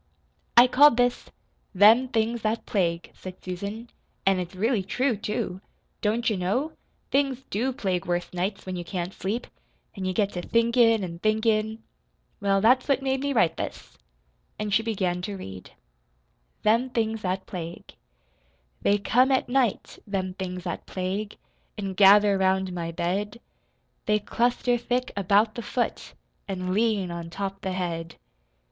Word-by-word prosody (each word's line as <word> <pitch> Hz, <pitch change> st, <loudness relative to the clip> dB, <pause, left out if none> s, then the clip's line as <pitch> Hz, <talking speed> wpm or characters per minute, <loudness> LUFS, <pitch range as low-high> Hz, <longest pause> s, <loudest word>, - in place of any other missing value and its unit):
"I 240 Hz, -, +10 dB
called 275 Hz, +1 st, +6 dB
this 245 Hz, 0 st, +1 dB, 0.5 s
'Them 220 Hz, +7 st, +7 dB
Things 230 Hz, -1 st, 0 dB
That 220 Hz, +2 st, -1 dB
Plague,'" 170 Hz, -4 st, -1 dB
said 185 Hz, -1 st, -9 dB
Susan. 200 Hz, +6 st, -5 dB, 0.4 s
"An' 195 Hz, -1 st, +3 dB
it's 180 Hz, 0 st, -5 dB
really 220 Hz, +3 st, +1 dB
true, 245 Hz, +6 st, 0 dB
too. 195 Hz, -3 st, -3 dB, 0.4 s
Don't 225 Hz, +3 st, 0 dB
you 215 Hz, -, +1 dB
know? 210 Hz, -, -1 dB, 0.4 s
Things 270 Hz, -2 st, +1 dB
DO 240 Hz, +6 st, 0 dB
plague 185 Hz, -7 st, -2 dB
worse 175 Hz, 0 st, -2 dB
nights, 190 Hz, +3 st, -3 dB
when 185 Hz, -1 st, -4 dB
you 175 Hz, -, -4 dB
can't 180 Hz, +1 st, -4 dB
sleep. 210 Hz, +6 st, -3 dB, 0.5 s
An' 190 Hz, -2 st, -5 dB
you 185 Hz, -, 0 dB
get 200 Hz, +1 st, +1 dB
to 175 Hz, -, -4 dB
thinkin' 230 Hz, 0 st, +3 dB
an' 170 Hz, -2 st, -6 dB
thinkin'. 220 Hz, +1 st, +1 dB, 0.6 s
Well, 195 Hz, -1 st, +2 dB
that's 250 Hz, +4 st, +4 dB
what 275 Hz, -2 st, +1 dB
made 265 Hz, 0 st, 0 dB
me 280 Hz, 0 st, -1 dB
write 175 Hz, -, +2 dB
this." -, -, -7 dB, 0.6 s
And 210 Hz, -1 st, -3 dB
she 215 Hz, -, +4 dB
began 190 Hz, -6 st, -1 dB
to 200 Hz, +2 st, -5 dB
read: 95 Hz, -, -9 dB, 0.9 s
THEM 230 Hz, +4 st, +3 dB
THINGS 225 Hz, -2 st, -1 dB
THAT 190 Hz, 0 st, -2 dB
PLAGUE 170 Hz, -2 st, -7 dB, 0.9 s
They 205 Hz, -, +3 dB
come 250 Hz, +6 st, +3 dB
at 260 Hz, -2 st, +1 dB
night, 250 Hz, -4 st, 0 dB
them 190 Hz, -2 st, -2 dB
things 185 Hz, -1 st, -5 dB
that 175 Hz, -, -5 dB
plague, 195 Hz, +3 st, -3 dB, 0.4 s
An' 195 Hz, -2 st, -3 dB
gather 200 Hz, +1 st, +6 dB
round 190 Hz, -1 st, +1 dB
my 170 Hz, -1 st, -3 dB
bed. 200 Hz, +7 st, -2 dB, 0.7 s
They 210 Hz, 0 st, +4 dB
cluster 240 Hz, +3 st, 0 dB
thick 250 Hz, +2 st, -1 dB
about 200 Hz, +3 st, +3 dB
the 235 Hz, -, -5 dB
foot, 240 Hz, +2 st, -3 dB, 0.3 s
An' 185 Hz, -2 st, -3 dB
lean 210 Hz, -4 st, +1 dB
on 170 Hz, -1 st, -6 dB
top 195 Hz, +2 st, -5 dB
the 190 Hz, -2 st, -3 dB
head. 170 Hz, -2 st, -4 dB
205 Hz, 155 wpm, -26 LUFS, 185-230 Hz, 0.9 s, I